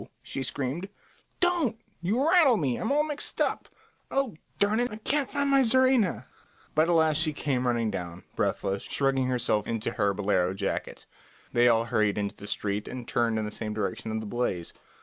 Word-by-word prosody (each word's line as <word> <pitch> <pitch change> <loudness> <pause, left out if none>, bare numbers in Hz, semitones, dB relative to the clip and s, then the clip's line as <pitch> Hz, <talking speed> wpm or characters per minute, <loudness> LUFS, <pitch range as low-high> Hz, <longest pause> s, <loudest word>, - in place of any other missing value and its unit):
she 135 - -5
screamed. 140 +8 -3 0.5
"Don't; 340 -11 +1 0.2
you 225 - +1
rattle 320 -9 +6
me. 135 -8 0
I'm - - -2
all 295 +1 +3
mixed 295 -1 -3
up. - - 0 0.4
Oh, 270 -7 0 0.2
darn 205 +3 +2
it, 245 0 +1
I 210 - -7
can't 275 +5 -1
find 280 0 0
my 275 0 +6
czarina!" 255 -5 +3 0.5
But 155 +2 +3
at - - +4
last 160 -2 +4
she 155 -1 +1
came 130 -4 -1
running 115 -2 +1
down, 90 -2 -6
breathless, 95 0 -1
shrugging 135 -2 0
herself 120 -4 0
into 115 -2 -2
her 100 - +1
bolero 95 -2 +1
jacket. 100 0 -3 0.5
They 120 0 +5
all 115 -1 +4
hurried 105 -3 +1
into 100 -1 -2
the 100 - -10
street 105 0 -2
and 125 -2 -7
turned 120 -4 +1
in 110 - -1
the 105 - -5 0.2
direction 110 +1 -3
of 110 0 -2
the - - -6
blaze. 100 -6 -2
130 Hz, 185 wpm, -28 LUFS, -, 0.5 s, rattle